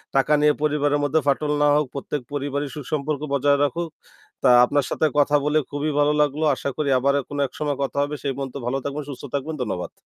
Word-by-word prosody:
টাকা 135 +2 +3
নিয়ে 150 0 +5
পরিবারের 145 -1 +1
মধ্যে 145 +3 +2
ফাটল 145 +2 +1
না - - +5
হোক। 150 0 +2
প্রত্যেক 140 0 -4
পরিবারই 145 0 -2
সুসম্পর্ক 150 0 -3
বজায় 140 +1 +3
রাখুক। 165 +3 -1 0.5
তা - - +5 0.2
আপনার 145 +1 0
সাথে - - 0
কথা 145 0 +4
বলে 150 +1 +2
খুবই 145 +2 -2
ভালো 145 +1 +3
লাগলো। 150 +1 0
আশা 140 - -3
করি 150 -2 0
আবার 140 +2 +2
এক 135 - -6
কোন 145 - -5
এক - - -27
সময় 145 -2 -1
কথা 140 - -4
হবে। 145 +1 -3
সেই 140 -2 -1
পর্যন্ত 135 -2 -5
ভালো 125 +3 0
থাকবেন, 145 +1 -3
সুস্থ 140 - -8
থাকবেন। 145 +3 -2
ধন্যবাদ। 95 -7 -3
145 Hz, 215 wpm, -23 LUFS, 140-150 Hz, 0.5 s, নিয়ে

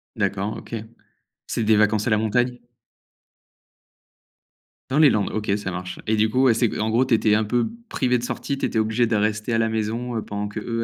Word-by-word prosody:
D'accord, 100 -1 -1
OK. - - -7 0.7
C'est - - -2
des 110 0 +4
vacances 105 0 +2
à - - +1
la 110 - +3
montagne? 120 +3 0 2.3
Dans 135 +3 +1
les 155 -2 +7
landes? 105 -5 0
OK, 110 -1 -2
ça 100 -2 -4
marche. 90 +1 -6
Et 110 - +1
du 110 +1 +2
coup, 130 +4 +2
ouais, 130 -3 +5
c'est, 115 0 0
en 110 +1 0
gros, 120 +4 +3
tu 125 - +3
étais 110 -1 +2
un 110 +1 +3
peu 115 +2 0 0.2
privé 125 -1 +1
de - - -7
sortie, 140 +3 -3
tu - - -1
étais - - -3
obligé 110 +2 +2
de 115 - 0
rester 105 +2 0
à - - +2
la 115 0 +2
maison, 110 +3 -2
heu, 110 - -2
pendant 105 0 -4
qu'eux 115 +2 -3
110 Hz, 215 wpm, -23 LUFS, 105-120 Hz, 2.3 s, les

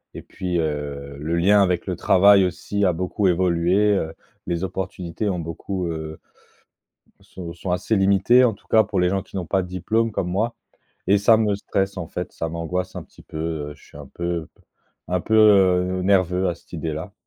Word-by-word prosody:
et - - -6
puis, 90 -2 -3
heu, 70 -2 -4
le 80 +3 -2
lien 100 +4 +5
avec 90 -1 -1
le 90 - -2
travail 95 +2 +5
aussi 100 +3 -2
a 90 - +3
beaucoup 95 +3 -1
évolué, 90 +3 +2
heu, 80 -3 -3 0.3
les 85 +1 -2
opportunités 95 +1 -4
ont 90 -3 -1
beaucoup, 85 +3 -4
heu 80 -1 -5 1.0
sont, 85 -3 -9
sont 90 +1 -5
assez 90 +5 0
limitées 100 +6 +4
en 115 -4 +3
tout - - -20
cas 110 -1 +5
pour 100 -4 -2
les 90 0 +3
gens 95 0 0
qui 95 - -15
n'ont 90 -3 -3
pas 95 +2 +1
de 90 - -6
diplôme 110 +6 -1
comme 95 -3 -2
moi 110 +6 -1 0.5
et 100 +2 +5
ça 110 +3 +5
me 105 -2 +1
stresse 100 0 -2
en 85 -3 -4
fait, 90 - -5
ça 80 - -4
m'angoisse 90 +3 -4
un - - -5
petit - - -19
peu, - - -9 0.3
heu. - - -11
Je - - -22
suis - - -15
un 75 -1 -10
peu 85 +2 -4
p - - -26 0.5
un 90 0 -1
peu, 110 - 0
heu, 95 -4 +4
nerveux 95 -1 +2
à 85 - -3
cette 85 - -24
idée-là 80 +3 -5
90 Hz, 205 wpm, -22 LUFS, 85-100 Hz, 1.0 s, lien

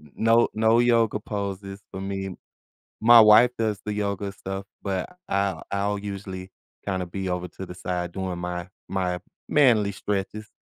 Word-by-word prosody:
No 115 +1 +4
no 110 +1 +4
yoga 115 -3 +3
poses 100 -1 -5
for 95 - -6
me. 95 -1 -4 0.7
My 120 +1 +9
wife 110 +3 +8
does 110 -3 0
the 105 - -2
yoga 100 -1 -2
stuff, 95 0 -6 0.2
but 95 - -3
I'll 100 0 0
I'll 100 +1 0
usually 95 -2 -6 0.4
kinda 95 -2 -1
be 95 +2 -4
over 90 0 -2
to 95 - -8
the 90 - -9
side 90 -1 -3
doing 95 -2 -3
my 90 +1 -4 0.2
my 90 -2 -1 0.3
manly 115 -8 +4
stretches. 100 +2 -3
100 Hz, 155 wpm, -25 LUFS, 95-105 Hz, 0.7 s, My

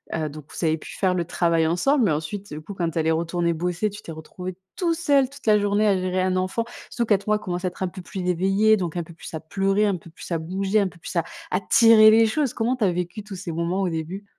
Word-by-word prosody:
heu 155 -2 -2
donc 150 0 -10
vous - - -3
avez 160 0 +2
pu - - -10
faire 190 -2 +2
le 180 -1 0
travail 165 -1 +1
ensemble. 240 - +2
Mais 185 - +2
ensuite, 175 +7 -4
heu, 150 - -5
du - - -7
coup, 185 +6 -8
quand 170 -4 -2
elle 160 -1 +1
est - - +4
retournée 170 +1 0
bosser, 175 +5 -1
tu 205 +1 -10
t'es 165 - -9
retrouvé 180 +3 -7 0.2
tout 340 -2 +1
seul 285 -6 +2
toute 280 +1 -15
la 210 -1 +6
journée 205 +1 +2
à 200 - +4
gérer 185 0 -1
un 185 0 +1
enfant. 185 +5 -1 0.2
Surtout 235 -2 -2
4 205 -2 +1
mois, 210 0 +3
il - - -10
commence 180 -3 -4
à - - +2
être 180 - -6
un - - 0
peu 185 - -9
plus 185 +1 -6
éveillé, 195 +5 +3
donc 175 -3 -3
un 170 - -1
peu 170 - -13
plus 165 - -11
à - - -3
pleurer, 195 +6 +1
un 200 -2 +1
peu 170 - -14
plus 165 - -11
à 170 - +1
bouger, 190 +5 0
un 200 - +1
peu 180 - -19
plus 170 - -8
à 170 - +2 0.3
à 180 - +2
tirer 215 +2 +7
les 225 +1 +6
choses. 270 +3 0
Comment 240 +3 0
tu 250 - -2
as 185 - +3
vécu 180 +4 -4
tous 205 -1 -8
ces 180 -2 -6
moments 170 +4 -1
au 185 - +1
début? 170 +5 -5
185 Hz, 290 wpm, -24 LUFS, 170-210 Hz, 0.3 s, tirer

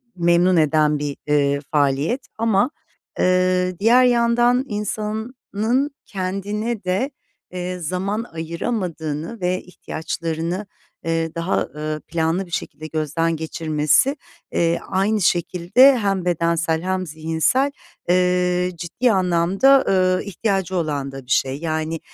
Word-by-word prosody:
memnun 175 +1 +3
eden 150 -1 +3
bir, 145 -1 -3
eee, 140 -1 +2
faaliyet 145 - +1
ama, 225 +1 +2 0.5
eee, 185 0 +2
diğer 235 +5 +5
yandan 240 +1 +3
insanın 220 +4 -2
kendine 205 +4 -3
de, 190 +10 -1 0.4
eee, 180 0 -4
zaman 190 +7 -2
ayıramadığını 165 +1 -4
ve 180 +1 0
ihtiyaçlarını, 170 +2 -4 0.4
eee, 165 -1 -1
daha, 170 +3 0
ııı, 155 0 -5
planlı 165 +3 0
bir 175 - -17
şekilde 155 -2 -5
gözden 160 +2 -1
geçirmesi, 155 - +1 0.4
eee, 170 0 +1
aynı 205 +3 +1
şekilde 180 +10 +4
hem 195 -4 0
bedensel 170 -1 +1
hem 185 0 -1
zihinsel, 160 - 0 0.4
eee, 180 0 +2
ciddi 225 +9 0
anlamda, 190 +9 +3
ııı, 185 -1 +3
ihtiyacı 195 -2 -1
olan 145 -5 -2
da 135 -1 -9
bir 125 - -9
şey, 135 0 +2
yani, 160 0 -2
180 Hz, 115 wpm, -21 LUFS, 160-205 Hz, 0.5 s, diğer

